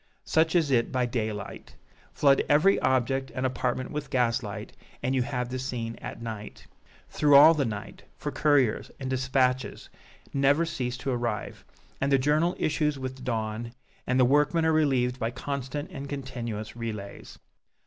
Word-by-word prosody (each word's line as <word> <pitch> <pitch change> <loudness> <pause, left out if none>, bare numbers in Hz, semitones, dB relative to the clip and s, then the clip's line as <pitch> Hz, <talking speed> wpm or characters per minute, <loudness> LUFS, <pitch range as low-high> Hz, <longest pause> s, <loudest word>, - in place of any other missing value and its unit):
Such 160 +1 +2
is 160 -5 +3
it 120 -3 +2
by 125 -1 +1
daylight. 110 -4 -4 0.4
Flood 140 -1 +4
every 155 +7 +5
object 130 +1 +1
and 130 - -1
apartment 130 0 -2
with 150 -2 -4
gaslight, 120 -5 -1 0.3
and 130 +2 0
you 130 - +2
have 125 -1 -2
the 130 0 -4
scene 120 -3 -4
at - - -8
night 110 -2 -7 0.5
through 145 -2 +4
all 150 +4 +9
the 145 -4 0
night, 105 -3 -6 0.2
for - - -4
couriers 140 -7 +2
and 130 -1 -4
dispatches 130 0 0 0.4
never 140 +4 +3
cease 125 -6 -3
to 135 - -3
arrive 120 -4 -3 0.4
and 135 +1 +1
the 135 - +6
journal 150 +6 +2
issues 150 -1 0
with 130 0 -5
the - - -14
dawn 115 -1 -3 0.3
and 125 +1 +2
the 125 - +6
workmen 150 +5 +3
are 160 - +3
relieved 130 -5 +2
by 115 - 0
constant 140 +5 -5
and 140 -4 -7
continuous 120 -6 -5
relays. 105 -4 -7
130 Hz, 160 wpm, -27 LUFS, 120-145 Hz, 0.5 s, all